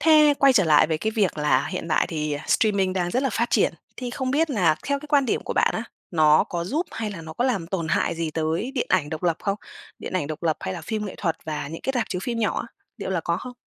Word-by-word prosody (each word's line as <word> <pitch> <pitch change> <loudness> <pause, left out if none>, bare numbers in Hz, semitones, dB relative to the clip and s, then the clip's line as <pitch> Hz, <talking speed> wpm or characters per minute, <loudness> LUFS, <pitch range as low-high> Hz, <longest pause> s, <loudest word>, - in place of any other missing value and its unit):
thế 305 -1 +6
quay 275 -1 +6
trở 200 -7 +4
lại 150 -1 +5
với 155 -1 -1
cái 220 +5 -1
việc 205 -7 0
là 150 0 +2
hiện 180 -3 -4
tại - - +2
thì 150 -2 -2
streaming 200 -4 +2
đang 175 -2 -1
rất 255 +6 0
là 270 - +1
phát 235 +2 0
triển, 200 - +3 0.2
thì 250 -1 -4
không 255 +1 -2
biết 310 +2 +2
là 175 - +3
theo 280 0 +1
cái 300 - -10
quan 285 -3 +3
điểm - - 0
của - - -3
bạn - - +3
á, - - -2 0.3
nó 155 -2 +5
có 170 -1 -4
giúp 305 - -1
hay 220 -2 -3
là 170 -5 -7
nó 160 0 -8
có 240 - -1
làm 220 -10 0
tổn 170 -3 -3
hại 165 - +1
gì 165 -1 -2
tới 160 - -1
điện 250 - 0
ảnh 165 -6 +2
độc 160 +2 -5
lập 170 -2 +2
không? 200 0 -1 0.4
Điện - - -7
ảnh 180 -6 0
độc 155 +1 -6
lập, 160 -2 +1
hay 95 - -3
là - - -6
phim 215 -1 -3
nghệ 190 - -7
thuật 165 -4 -1
và 150 -2 -4
những 165 - -7
cái 265 - -1
rạp 240 - 0
chiếu 180 - -3
phim 235 -2 -2
nhỏ 215 -2 0
á, - - -6 0.3
liệu 200 - -4
là 185 -3 0
có 170 +1 -1
không? 250 +5 -7
185 Hz, 290 wpm, -24 LUFS, 160-245 Hz, 0.4 s, thế